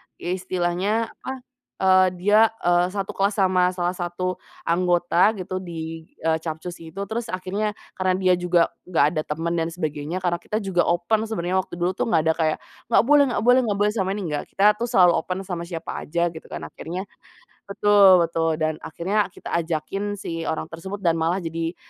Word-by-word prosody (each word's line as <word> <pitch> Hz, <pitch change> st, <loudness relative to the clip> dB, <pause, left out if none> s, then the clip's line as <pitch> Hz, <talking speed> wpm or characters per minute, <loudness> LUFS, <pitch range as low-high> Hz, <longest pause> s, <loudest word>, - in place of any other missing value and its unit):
istilahnya 185 Hz, +4 st, -1 dB
apa, 265 Hz, -, -7 dB, 0.5 s
eee, 185 Hz, 0 st, +6 dB
dia, 210 Hz, +5 st, +5 dB, 0.2 s
eee, 175 Hz, 0 st, +3 dB
1 195 Hz, -1 st, -2 dB
kelas 200 Hz, +1 st, 0 dB
sama 185 Hz, -2 st, +2 dB
salah 175 Hz, 0 st, 0 dB
satu 180 Hz, 0 st, -3 dB, 0.2 s
anggota 175 Hz, +3 st, +2 dB
gitu 185 Hz, 0 st, -4 dB
di 165 Hz, -2 st, -7 dB, 0.2 s
eee, 160 Hz, 0 st, +2 dB
Capcus 160 Hz, +2 st, -6 dB
itu. 165 Hz, +4 st, -6 dB
Terus 230 Hz, +1 st, -3 dB
akhirnya 195 Hz, +3 st, -2 dB, 0.2 s
karena 185 Hz, 0 st, +2 dB
dia 185 Hz, -1 st, +3 dB
juga 175 Hz, -1 st, +2 dB, 0.2 s
nggak 160 Hz, -5 st, +3 dB
ada 155 Hz, -, +1 dB
teman 170 Hz, +1 st, -2 dB
dan 165 Hz, -, 0 dB
sebagainya, 160 Hz, +1 st, -4 dB
karena 175 Hz, -1 st, 0 dB
kita 215 Hz, +3 st, -3 dB
juga 180 Hz, -3 st, +1 dB
open 210 Hz, +6 st, +1 dB
sebenarnya 185 Hz, -3 st, -1 dB
waktu 185 Hz, -, -5 dB
dulu 175 Hz, +1 st, 0 dB
tuh 190 Hz, -, -2 dB
nggak 160 Hz, -8 st, +2 dB
ada -, -, +4 dB
kayak, 155 Hz, -1 st, +1 dB, 0.3 s
"Enggak 230 Hz, -, +4 dB
boleh 290 Hz, +2 st, +6 dB
enggak 240 Hz, -, -1 dB
boleh 250 Hz, +2 st, +6 dB
enggak 200 Hz, -1 st, -1 dB
boleh 210 Hz, -, +3 dB
sama 190 Hz, -3 st, 0 dB
ini," 185 Hz, -7 st, -4 dB
enggak, 145 Hz, -, -3 dB
kita 205 Hz, +2 st, +5 dB
tuh 235 Hz, -, -1 dB
selalu 180 Hz, -5 st, +5 dB
open 185 Hz, +3 st, -4 dB
sama 170 Hz, -2 st, -5 dB
siapa 165 Hz, -2 st, -5 dB, 0.2 s
aja 170 Hz, +2 st, 0 dB
gitu 160 Hz, -, -11 dB
kan. 75 Hz, 0 st, -7 dB
Akhirnya 170 Hz, -, -6 dB, 0.6 s
betul 200 Hz, -2 st, +6 dB
betul, 165 Hz, -1 st, 0 dB
dan 155 Hz, 0 st, 0 dB
akhirnya 200 Hz, +6 st, -1 dB
kita -, -, -9 dB
ajakin 170 Hz, +5 st, -2 dB
si 165 Hz, -4 st, -5 dB
orang 160 Hz, -, -3 dB
tersebut 190 Hz, +5 st, -7 dB
dan 165 Hz, -2 st, +2 dB
malah 170 Hz, +3 st, 0 dB
jadi, 165 Hz, +1 st, -3 dB
180 Hz, 185 wpm, -23 LUFS, 165-195 Hz, 0.6 s, eee